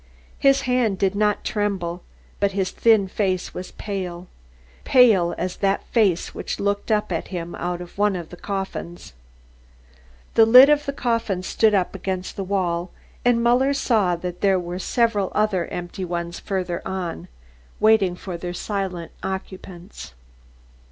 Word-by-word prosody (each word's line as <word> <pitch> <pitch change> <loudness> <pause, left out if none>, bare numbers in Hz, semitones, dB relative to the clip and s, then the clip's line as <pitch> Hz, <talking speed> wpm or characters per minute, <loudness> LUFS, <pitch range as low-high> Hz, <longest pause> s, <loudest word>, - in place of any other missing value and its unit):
His 275 0 +4
hand 250 -6 +1
did 190 0 +1
not 210 0 +1
tremble 190 -5 -2 0.4
but 200 -1 +1
his 190 -1 -1
thin 220 -4 +3
face 185 -2 -1
was 180 - -6
pale 185 -3 -5 0.6
pale 215 -9 +5
as 180 +1 -3
that 195 0 0
face 200 -7 +1
which - - -5
looked 200 +2 -1
up 210 -3 +1
at 165 - -2
him 175 -2 -5
out 175 0 -3
of 175 +2 -11
one 205 -1 +3
of 170 -3 -6
the - - -9
coffins. 190 - -6 1.2
The 225 -1 +6
lid 255 +5 +9
of 295 -1 +2
the - - 0
coffin 230 -7 -1
stood 215 +2 +2
up 185 -2 0
against 185 -1 -4
the 195 - -3
wall 180 -2 -1 0.3
and 240 -1 +3
Muller 255 +4 +3
saw 215 -9 +2
that 180 +1 -6
there 195 -2 +3
were 175 +1 -5
several 215 -2 +1
other 205 -5 +1
empty 175 +2 -6
ones 170 -1 -4
further 185 -3 -3
on, 180 - -4 0.5
waiting 215 -5 +4
for 180 -1 -6
their 175 +1 -5
silent 190 -4 -4
occupants. 190 - -7
190 Hz, 150 wpm, -23 LUFS, 180-215 Hz, 1.2 s, lid